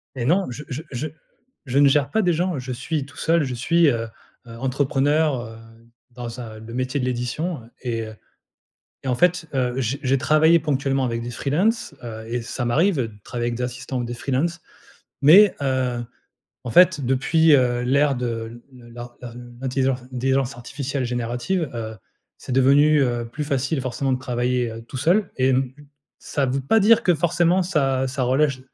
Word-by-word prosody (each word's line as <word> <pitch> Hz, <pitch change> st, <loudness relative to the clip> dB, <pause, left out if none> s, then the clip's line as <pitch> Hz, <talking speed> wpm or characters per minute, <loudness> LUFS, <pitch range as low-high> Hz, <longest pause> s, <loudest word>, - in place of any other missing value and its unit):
Et 120 Hz, -, -3 dB
non, 185 Hz, +8 st, +3 dB
je 130 Hz, +5 st, -7 dB
je 140 Hz, +3 st, -5 dB
je 135 Hz, +5 st, -3 dB, 0.6 s
je 135 Hz, +2 st, +1 dB
ne 145 Hz, -, +7 dB
gère 140 Hz, 0 st, +2 dB
pas 220 Hz, -, +2 dB
des 180 Hz, -3 st, +2 dB
gens, 175 Hz, -2 st, -1 dB
je 130 Hz, 0 st, -6 dB
suis 140 Hz, +3 st, -3 dB
tout 145 Hz, -, -16 dB
seul, 165 Hz, -1 st, +2 dB
je 130 Hz, -2 st, -3 dB
suis, 165 Hz, +7 st, +3 dB
heu, 115 Hz, -4 st, 0 dB, 0.4 s
heu, 115 Hz, 0 st, -10 dB
booké, 135 Hz, +1 st, 0 dB
heu, 140 Hz, -7 st, 0 dB, 0.6 s
dans 120 Hz, 0 st, -7 dB
un 110 Hz, -2 st, -9 dB
le 115 Hz, +1 st, -10 dB
métier 130 Hz, +3 st, -2 dB
de 125 Hz, -, -1 dB
l'édition, 125 Hz, +4 st, -3 dB
heu 115 Hz, -, -17 dB
et 115 Hz, -3 st, -2 dB
heu, 110 Hz, -, -10 dB, 0.9 s
et -, -, -3 dB
en 125 Hz, -, +2 dB
fait, 175 Hz, +4 st, +2 dB
heu, 130 Hz, 0 st, 0 dB
j 130 Hz, +3 st, -1 dB
je 130 Hz, 0 st, +1 dB
travaillais 155 Hz, +4 st, +4 dB
ponctuellement 135 Hz, -3 st, 0 dB
avec 115 Hz, -1 st, -2 dB
des 120 Hz, -, -5 dB
freelance, 165 Hz, -, 0 dB
heu 110 Hz, -1 st, -7 dB
et 120 Hz, +1 st, -3 dB
ça 120 Hz, +1 st, -4 dB
m'arrive 160 Hz, +10 st, +2 dB
de 115 Hz, -4 st, -1 dB
travailler 120 Hz, -1 st, -3 dB
avec 120 Hz, -, -3 dB
des 125 Hz, -, -4 dB
assistants 125 Hz, +1 st, -4 dB
ou 120 Hz, -, -2 dB
des 120 Hz, -, -5 dB
freelance. 145 Hz, +7 st, -1 dB, 0.6 s
Mais, 190 Hz, +8 st, +7 dB
heu, 130 Hz, -3 st, -1 dB, 0.6 s
en 120 Hz, -, -5 dB
fait 175 Hz, -2 st, +5 dB
depuis, 150 Hz, +5 st, +3 dB
heu, 125 Hz, -2 st, +2 dB
l'ère 140 Hz, +2 st, +2 dB
de 115 Hz, -1 st, -4 dB
le 120 Hz, -2 st, -15 dB
lar, 120 Hz, +1 st, -10 dB
heu, 120 Hz, -, -6 dB, 0.3 s
l'intelligence 130 Hz, -1 st, 0 dB
intelligence 135 Hz, 0 st, 0 dB
artificielle 135 Hz, +3 st, -4 dB
générative, 125 Hz, +8 st, -2 dB
heu, 110 Hz, -1 st, -5 dB, 0.4 s
c'est -, -, -9 dB
devenu, 140 Hz, +3 st, +5 dB
heu, 120 Hz, -2 st, -1 dB
plus 145 Hz, +6 st, -5 dB
facile 140 Hz, 0 st, -1 dB
forcément 130 Hz, +1 st, -1 dB
de 125 Hz, -, -2 dB
travailler, 125 Hz, -1 st, -1 dB
heu, 115 Hz, -, -8 dB
tout 120 Hz, -, -8 dB
seul 175 Hz, -, +2 dB
et 130 Hz, +1 st, +3 dB
m 130 Hz, 0 st, +1 dB, 0.5 s
ça 140 Hz, -2 st, -1 dB
veut 135 Hz, +2 st, -1 dB
pas 220 Hz, +12 st, +3 dB
dire 225 Hz, +3 st, +5 dB
que 180 Hz, -, +4 dB
forcément 175 Hz, +3 st, +2 dB
ça 135 Hz, -7 st, 0 dB
ça 130 Hz, 0 st, -2 dB
relèche 135 Hz, +1 st, +1 dB
130 Hz, 190 wpm, -22 LUFS, 120-150 Hz, 0.9 s, ne